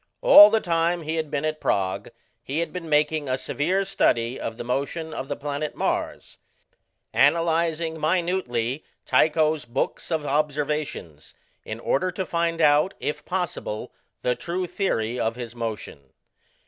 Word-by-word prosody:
All - - +10
the 220 +1 +2
time 170 -1 0
he 155 +1 -3
had 155 -2 -2
been 145 0 -2
at 155 0 -2
Prague 95 -1 -1 0.3
he 140 - -4
had 170 - -2
been 175 -3 -6
making 150 -1 +1
a 130 - +1
severe 160 +9 -1
study 120 -10 +1
of 115 - -5
the - - -5
motion 140 +6 -3
of 135 - -5
the - - -3
planet 145 +1 -4
Mars, - - -3 0.7
analyzing 165 +1 +2
minutely 155 -7 -1 0.2
Tycho's 155 -1 +2
books 120 +3 -3
of 160 -3 -1
observations, 150 - -2 0.3
in 110 +1 -6
order 140 +9 0
to 190 +1 -3
find 170 -1 -1
out, 150 +5 +4
if 150 - -3
possible, 175 - -4 0.3
the 125 - +2
true 180 +6 -3
theory 125 - -1
of 115 +1 0
his 120 -2 -7
motion. 110 - -6
150 Hz, 150 wpm, -24 LUFS, 130-170 Hz, 0.7 s, All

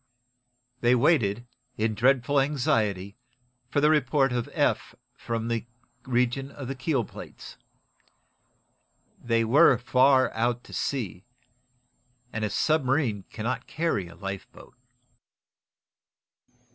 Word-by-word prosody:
They 120 +1 +4
waited, 120 -5 +2 0.3
in 110 0 0
dreadful 130 +4 +2
anxiety, 110 -8 0 0.5
for 145 - +1
the 150 +1 +5
report 135 -2 +2
of 120 -1 -2
Eph - - 0 0.2
from 115 -1 -4
the 115 0 -2 0.4
region 125 +2 0
of 140 -2 -8
the 135 - -3
keel 130 -2 -1
plates. - - -11 1.7
They 115 -1 +2
were 135 +3 +5
far 130 +2 +3
out 120 +1 -1
to - - -14
sea, 95 - -3 1.1
and 110 - -3
a 105 - 0
submarine 135 -5 +1
cannot 120 +3 -4
carry 150 - -1
a 85 - -13
lifeboat! 95 +2 -8
120 Hz, 110 wpm, -26 LUFS, 110-135 Hz, 1.7 s, the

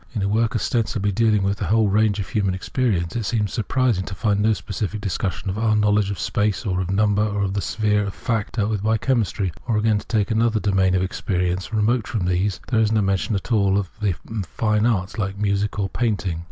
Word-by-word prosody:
In 105 - -1
a - - +1
work 110 +3 +1
ostensibly 105 -2 0
dealing 105 0 +2
with 100 0 0
the - - -1
whole 110 0 +3
range 105 0 +2
of 100 - -3
human 100 -5 0
experience, 95 -4 -1
it 115 - -1
seems 105 -1 -1
surprising 115 -3 +1
to 95 - -6
find 100 0 +1
no 110 +2 +3
specific 100 +4 -4
discussion 100 -1 -3
of 95 +2 -2
our 110 -1 +2
knowledge 105 -1 +2
of 100 - -3
space 105 +6 -1
or 95 -2 0
of 90 - -3
number, 105 +1 +2
or 105 -1 0
of 95 -1 -1
the 100 - -1
sphere 105 -1 +1
of 100 - -5
lact 115 -4 0
dealt 110 -2 0
with 105 -3 -1
by 110 +2 +2
chemistry; 110 -6 0 0.2
or 115 -3 +1
again, 105 -1 +2
to - - -13
take 110 -2 0
another 110 0 +2
domain 95 -2 +2
of 95 - +1
experience 90 -1 -2
remote 110 +1 +1
from 105 -5 -2
these, 95 +2 0
there 115 - +2
is 110 -1 +2
no 110 -2 +2
mention 100 +2 0
at 100 +5 -4
all 100 -3 +3
of 95 -3 -2
important 100 0 -3
fine 105 +2 +1
arts, 105 -2 -1
like 100 -1 -2
music 100 0 0
or 100 -2 0
painting. 100 -7 -1
105 Hz, 230 wpm, -22 LUFS, 95-110 Hz, 0.2 s, whole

